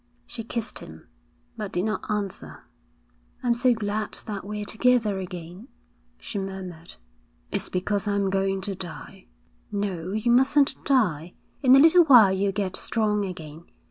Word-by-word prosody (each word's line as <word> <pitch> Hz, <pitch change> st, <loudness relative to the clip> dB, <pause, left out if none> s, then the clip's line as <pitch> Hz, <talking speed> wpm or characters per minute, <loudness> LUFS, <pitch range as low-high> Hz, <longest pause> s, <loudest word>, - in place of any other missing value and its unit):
She 230 Hz, -, -7 dB
kissed 230 Hz, 0 st, -4 dB
him, 80 Hz, 0 st, -12 dB, 0.5 s
but 210 Hz, -3 st, -5 dB
did 180 Hz, +3 st, -1 dB
not 215 Hz, +1 st, -3 dB
answer. 195 Hz, -, -4 dB, 0.8 s
'I'm 240 Hz, -1 st, +3 dB
so 245 Hz, +1 st, +3 dB
glad 210 Hz, 0 st, -3 dB
that 205 Hz, -3 st, -5 dB
we're 210 Hz, +1 st, -5 dB
together 220 Hz, -3 st, +2 dB
again,' 180 Hz, +3 st, -8 dB, 0.5 s
she 205 Hz, -, -5 dB
murmured. 185 Hz, -3 st, -7 dB, 0.6 s
'It's -, -, -2 dB
because 200 Hz, +3 st, -1 dB
I'm 200 Hz, -1 st, 0 dB
going 195 Hz, 0 st, 0 dB
to 195 Hz, +1 st, -3 dB
die.' 175 Hz, -, -10 dB, 0.4 s
'No, 190 Hz, -4 st, -3 dB
you 220 Hz, +3 st, +1 dB
mustn't 270 Hz, +3 st, +3 dB
die. 180 Hz, -, +1 dB, 0.3 s
In 260 Hz, -2 st, +7 dB
a -, -, +7 dB
little 330 Hz, +3 st, +7 dB
while 240 Hz, -9 st, +8 dB
you'll 195 Hz, +1 st, 0 dB
get 190 Hz, -2 st, -2 dB
strong 210 Hz, -2 st, 0 dB
again. 165 Hz, -3 st, -8 dB
200 Hz, 145 wpm, -25 LUFS, 185-225 Hz, 0.8 s, while